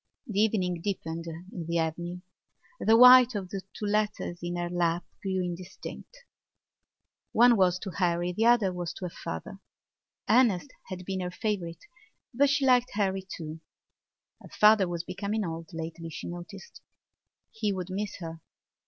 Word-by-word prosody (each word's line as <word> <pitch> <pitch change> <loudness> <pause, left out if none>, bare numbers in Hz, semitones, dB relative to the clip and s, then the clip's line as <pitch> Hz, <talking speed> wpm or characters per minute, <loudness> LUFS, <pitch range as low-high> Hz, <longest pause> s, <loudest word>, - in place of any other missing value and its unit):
The 210 -6 -2
evening 185 -6 +1
deepened 165 -4 -4
in 165 +1 -7
the 170 0 0
avenue. 170 +2 -2 0.6
The 225 +1 +5
white 250 0 +9
of 190 -3 -4
two 195 +2 -6
letters 210 -4 -1
in 175 0 -3
her 175 0 -2
lap 175 -1 0 0.2
grew 190 -2 -1
indistinct. 180 - -8 1.1
One 240 +1 +6
was 185 -3 +3
to 190 0 -6
Harry; 175 -1 0
the 220 +6 +1
other 225 -6 +4
was 175 -1 -4
to 185 - -6
her 175 - -5
father. 80 0 -6 0.7
Ernest 230 0 +3 0.2
had 185 -1 -7
been 190 0 -3
her 180 -1 -2
favourite 180 -4 -3 0.5
but 280 +4 +4
she 280 -1 +2
liked 250 -1 +4
Harry 195 -2 0 0.2
too. 160 -1 -7 0.8
Her - - -13
father 210 -2 +5
was 170 -1 -3
becoming 200 +4 -3
old 165 -1 -6
lately, 165 0 -6
she 160 - -7
noticed; 175 - -9 0.7
he 220 -2 -1
would 185 -1 -4
miss 205 +2 -3
her. 165 -1 -7
185 Hz, 155 wpm, -28 LUFS, 170-210 Hz, 1.1 s, white